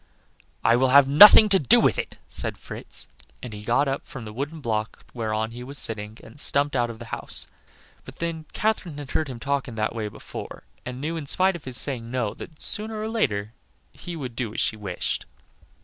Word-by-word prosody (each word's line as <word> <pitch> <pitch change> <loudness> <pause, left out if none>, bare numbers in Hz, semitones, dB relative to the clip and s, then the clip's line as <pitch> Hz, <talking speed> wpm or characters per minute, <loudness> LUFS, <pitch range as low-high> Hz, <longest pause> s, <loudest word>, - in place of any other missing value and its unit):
"I 115 - +5
will 130 +1 +3
have 135 +1 +7
nothing 205 +9 +10
to 195 -1 +6
do 130 - +5
with - - +3
it!" - - -5
said - - -1
Fritz, - - -6 0.4
and 120 - -6
he 105 - -8
got 120 +6 +2
up 135 +1 -3
from 120 -4 -8
the 105 - -8
wooden 145 +7 -4
block 110 -5 -3
whereon 110 -1 -2
he 120 +1 -8
was 140 +3 -4
sitting 110 -2 -2
and 115 +6 -13
stumped 145 -1 +1
out 120 -2 +1
of 115 - -7
the 120 - -9
house. - - -2 0.6
But, - - -12
then, 165 -2 -4
Katherine 210 -8 -1
had 145 -2 -8
heard 155 - 0
him 125 -3 -7
talk 140 +1 -1
in 120 - -8
that 110 0 -1
way 110 -2 -3
before, 105 - -9 0.2
and 125 0 -6
knew, 160 +4 -3
in 150 -3 -6
spite 190 +5 +2
of 170 - -9
his 130 -2 -1
saying 115 -3 0
"no," 120 -4 -1
that, 155 - -11
sooner 215 +1 +1
or 215 +1 -3
later, 110 - -1 0.4
he 175 - -7
would 130 -7 -6
do 115 -4 -3
as - - -2
she - - +2
wished. 100 -4 -3
130 Hz, 215 wpm, -25 LUFS, 115-150 Hz, 0.6 s, nothing